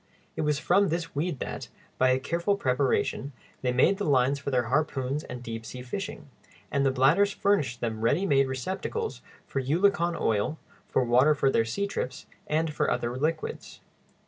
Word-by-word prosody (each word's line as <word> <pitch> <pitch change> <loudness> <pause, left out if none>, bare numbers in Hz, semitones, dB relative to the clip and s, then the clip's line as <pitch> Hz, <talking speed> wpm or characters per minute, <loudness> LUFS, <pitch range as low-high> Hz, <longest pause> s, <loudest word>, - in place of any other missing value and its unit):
It - - -2
was 150 -2 +1
from 195 +6 +3
this 165 0 -3
weed 155 +1 -1
that, - - -5 0.3
by 130 - +5
a 130 +1 +3
careful 170 +8 0
preparation, 135 -1 0 0.3
they 125 - +1
made 135 +11 +3
the - - -1
lines 140 -2 +2
for 140 - -4
their 125 -2 +2
harpoons 135 +2 -1
and 125 0 -7
deep 115 -1 -5
sea 125 +3 -8
fishing; 155 +2 -5 0.4
and 140 - +1
the 135 - +4
bladders 150 +11 +4
furnished 145 -15 +1
them 110 -2 -2
ready 145 - +2
made 135 -6 +3
receptacles 190 - -3 0.2
for 135 - -3
eulachon 170 +4 +2
oil, 110 +8 0 0.3
for 130 - +1
water 125 +5 +4
for 135 -1 +2
their 115 - +2
seatrips, 130 - -3 0.2
and 155 0 0
for - - 0
other 120 +1 -1
liquids. 155 +4 -3
140 Hz, 170 wpm, -27 LUFS, 125-170 Hz, 0.4 s, by